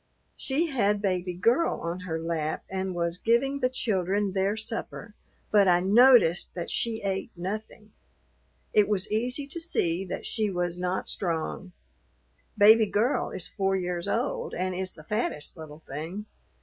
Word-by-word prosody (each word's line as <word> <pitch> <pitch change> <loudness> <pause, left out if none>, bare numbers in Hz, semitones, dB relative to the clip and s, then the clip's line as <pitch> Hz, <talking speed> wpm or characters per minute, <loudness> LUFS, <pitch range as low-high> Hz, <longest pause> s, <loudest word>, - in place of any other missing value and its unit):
She 285 +5 0
had 210 -6 +2
Baby 185 -3 -1
Girl 235 - +2
on 170 +2 -3
her 170 -3 -4
lap 160 -2 -2
and 190 -1 -2
was 170 0 -1
giving 270 +5 +1
the 255 -2 +2
children 200 -4 0
their 195 +2 0
supper, 220 -1 -4 0.4
but 205 -2 +5
I 175 -1 +5
noticed 200 -2 +5
that 175 - -3
she 225 -2 -1
ate 195 -1 -2
nothing. 210 +3 -6 0.8
It 210 -1 +4
was 205 -1 -1
easy 250 +6 -1
to 315 +4 -6
see 180 - 0
that 185 - -5
she 215 -3 +1
was 175 -1 -2
not 180 +1 -2
strong. 175 +1 -3 0.9
Baby 220 +1 +7
Girl 220 +7 +1
is 180 - -5
four 195 -2 0
years 180 -2 -2
old - - -2
and 185 0 -1
is 185 0 -4
the 155 - -13
fattest 185 -5 -2
little 155 -3 -10
thing. 160 +7 -7
195 Hz, 155 wpm, -27 LUFS, 175-220 Hz, 0.9 s, Baby